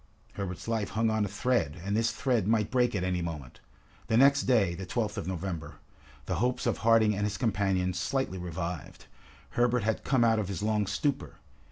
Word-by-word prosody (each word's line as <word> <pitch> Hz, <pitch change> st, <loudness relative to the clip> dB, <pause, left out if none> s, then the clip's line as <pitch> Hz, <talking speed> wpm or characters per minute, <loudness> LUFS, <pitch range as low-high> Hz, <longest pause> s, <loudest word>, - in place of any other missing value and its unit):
Herbert's 95 Hz, 0 st, -5 dB
life 110 Hz, -3 st, -1 dB
hung 110 Hz, +1 st, +1 dB
on 110 Hz, -1 st, +1 dB
a -, -, -2 dB
thread, 100 Hz, -, 0 dB
and 100 Hz, +1 st, 0 dB
this 115 Hz, +1 st, +2 dB
thread 125 Hz, -7 st, 0 dB
might 110 Hz, -2 st, +1 dB
break 125 Hz, -2 st, +2 dB
at 90 Hz, -, -1 dB
any 90 Hz, -1 st, 0 dB
moment. 75 Hz, -7 st, -6 dB, 0.5 s
The 110 Hz, -, +2 dB
next 140 Hz, +2 st, +5 dB
day, 105 Hz, -8 st, +3 dB
the 90 Hz, +2 st, -7 dB
12th 105 Hz, 0 st, -1 dB
of 85 Hz, -, -4 dB
November, 90 Hz, -3 st, -4 dB, 0.5 s
the -, -, -2 dB
hopes 125 Hz, +1 st, 0 dB
of -, -, 0 dB
Harding 115 Hz, -2 st, +4 dB
and 105 Hz, -, -2 dB
his 105 Hz, -1 st, -1 dB
companions 95 Hz, -5 st, 0 dB
slightly 95 Hz, -2 st, -1 dB
revived. 90 Hz, -2 st, -5 dB, 0.5 s
Herbert 120 Hz, -1 st, +2 dB
had 110 Hz, 0 st, -1 dB
come 130 Hz, -3 st, +2 dB
out 115 Hz, -1 st, +3 dB
of 105 Hz, -, -2 dB
his 100 Hz, 0 st, -4 dB
long 105 Hz, -2 st, +1 dB
stupor. 140 Hz, +8 st, -2 dB
105 Hz, 195 wpm, -29 LUFS, 90-115 Hz, 0.5 s, next